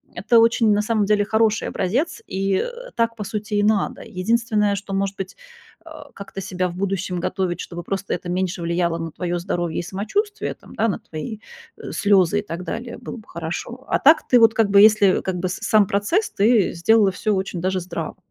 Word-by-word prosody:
это 230 +6 +3
очень, 230 -1 +4
на 205 - +2
самом 215 -1 +1
деле, 205 0 +2
хороший 220 0 +1
образец, 255 - -1
и, 195 0 0
а, - - -6
так, 230 0 0
по 215 - -5
сути, 210 +1 -4
и 205 - +2
надо. 210 -1 +1
Единственное, 210 +1 0
что, 200 0 -6
может 195 0 -1
быть, 190 -1 -6 0.5
а, 310 -3 -12
как-то 195 -1 -8
себя 185 -1 -2
в 175 - -9
будущем 190 -1 -2
готовить, 180 0 -2
чтобы 175 0 -7
просто, 195 +2 -3
это 175 - -4
меньше 185 0 -2
влияло 170 0 0
на 165 -1 -5
твоё 175 +1 -3
здоровье 175 -2 -2
и - - -3
самочувствие, 400 - -2
там - - -16
на 225 -4 0
твои, 210 +8 -7 0.4
э, - - -8
слёзы 200 -1 +3
и - - -5
так 175 -3 -6
далее, 235 +5 -5
было - - -8
бы 220 - -14
хорошо. 175 +10 -6
А - - +3
так 310 +3 +5
ты 250 - +5
вот, 225 -1 +6
как 220 -2 +2
бы, 200 0 +6
если, 210 -2 +5
как 185 -1 -3
бы, 185 +1 -2
с 180 - -3
сам 210 -3 +3
процесс, 265 - 0
ты 215 0 +3
сделала 200 +3 +3
всё 215 +3 -1
очень 190 -2 -3
даже 185 0 0
здраво. 175 - -5
200 Hz, 205 wpm, -22 LUFS, 185-225 Hz, 0.5 s, вот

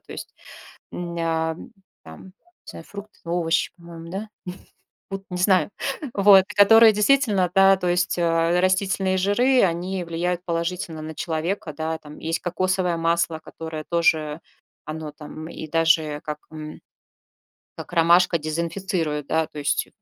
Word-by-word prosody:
То - - -20
есть, - - -9 0.6
м, 175 -1 -6
а, 160 -1 0
м, 160 - -9 0.4
там, 80 0 -12
не 190 - -14 0.4
знаю, - - -11
фрукт, 205 +1 -10
овощ, 170 -1 0
по-моему, 170 -1 -11
да? 200 +4 -5 0.8
Вот 195 0 -5
не 180 - -4
знаю, 185 +1 +3 0.4
вот, 200 -1 +7
которые 225 +2 +7
действительно, 210 -4 +2
да, 195 0 +6
то 180 -1 -2
есть, 180 +1 +1
а, 170 +1 +2
растительные 190 0 +1
жиры, 245 +7 +3
они 180 +1 -1
влияют 175 +1 -2
положительно 170 -1 -3
на 155 0 -7
человека, 165 +1 -3
да, 160 +2 -3
там. 150 0 -13
Есть 165 +1 -2
кокосовое 185 0 0
масло, 165 -1 0
которое 160 -1 -8
тоже 160 -2 +1 0.4
оно, 155 0 -6
там, 155 +1 -9
и 160 - -7
даже 160 -2 +2
как, 150 -1 -4
м, 155 -1 -8 1.0
как - - -9
ромашка, 170 +1 +4
дезинфицирует, 165 -1 -3
да, 160 +1 +1
то - - -11
есть. 145 - 0
170 Hz, 145 wpm, -23 LUFS, 160-190 Hz, 1.0 s, вот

